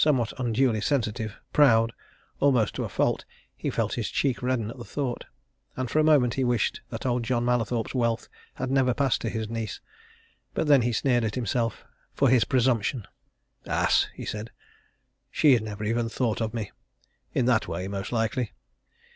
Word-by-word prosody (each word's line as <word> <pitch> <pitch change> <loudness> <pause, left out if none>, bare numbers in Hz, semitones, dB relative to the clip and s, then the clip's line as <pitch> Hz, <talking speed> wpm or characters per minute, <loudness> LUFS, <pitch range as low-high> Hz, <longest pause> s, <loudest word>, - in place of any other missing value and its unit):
Somewhat 130 -7 +2
unduly 120 -2 +1
sensitive, 110 -4 -1
proud, 115 -5 +5 0.5
almost 125 -7 +3
to - - -3
a - - -4
fault, - - 0 0.3
he - - -3
felt - - -1
his - - -2
cheek 135 -4 0
redden 125 -3 -1
at 125 - -11
the - - -6
thought, 130 -1 -3 0.5
and 130 -2 -3
for 155 - +2
a - - +4
moment 140 -6 +4
he 135 - 0
wished 120 -3 0
that - - -6
old 125 -1 +1
John 120 0 0
Mallathorpe's 120 -2 0
wealth 115 -3 0 0.3
had 130 0 -3
never 130 -2 +3
passed 135 -3 +1
to 115 - -1
his 110 -1 -3
niece. 115 -2 -4 0.8
But - - 0
then 145 -3 +6
he 120 +1 +1
sneered 120 +1 +2
at 110 -1 -2
himself 115 -1 -1 0.3
for 135 - +3
his 125 -2 +4
presumption. 125 -3 +1 0.6
"Ass!" - - +2
he - - -7
said. 105 +2 -5 0.8
"She's 135 -7 +4
never 105 -1 -6
even 115 +2 0
thought 115 -1 -1
of 110 -1 -1
me 110 -3 -4 0.6
in 125 - +2
that 120 -3 +2
way, 90 +2 -3
most 100 -1 -4
likely! 115 -1 -1
120 Hz, 175 wpm, -26 LUFS, 110-130 Hz, 0.8 s, then